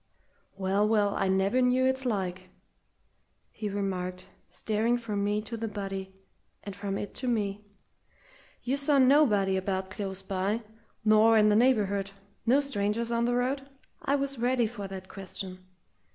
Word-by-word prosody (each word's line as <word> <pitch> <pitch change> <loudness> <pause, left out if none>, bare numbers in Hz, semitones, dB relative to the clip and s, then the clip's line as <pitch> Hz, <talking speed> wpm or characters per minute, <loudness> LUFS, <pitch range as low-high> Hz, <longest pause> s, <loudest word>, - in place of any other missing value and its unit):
"Well, 195 +2 +1
well, 210 -2 +2
I 195 - 0
never 195 +6 +2
knew 250 +1 +3
its 260 0 +1
like!" 185 -4 -2 1.0
he 210 - -4
remarked, 185 -2 -3 0.2
staring 225 +3 0
from 210 -4 -3
me 210 +1 0
to 230 +2 -5
the 225 0 -3
body, 195 -2 -5 0.5
and 200 -2 -7
from 200 -1 -3
it 205 - -5
to 255 - -4
me. 210 -3 -1 1.0
"You 260 +3 0
saw 280 0 +3
nobody 255 -9 +4
about 190 0 -2
close 190 -1 -5
by 195 +4 -1 0.4
nor 220 +1 +6
in 215 0 +5
the 210 - +4
neighbourhood 205 -5 +2 0.4
no 265 +5 +5
strangers 230 -3 -1
on 235 0 +1
the 245 0 +1
road?" 270 +3 -1 0.3
I 280 - +1
was 275 -2 -2
ready 245 0 +2
for 215 -3 -5
that 190 -1 -8
question. 185 -1 -7
210 Hz, 150 wpm, -29 LUFS, 195-245 Hz, 1.0 s, nor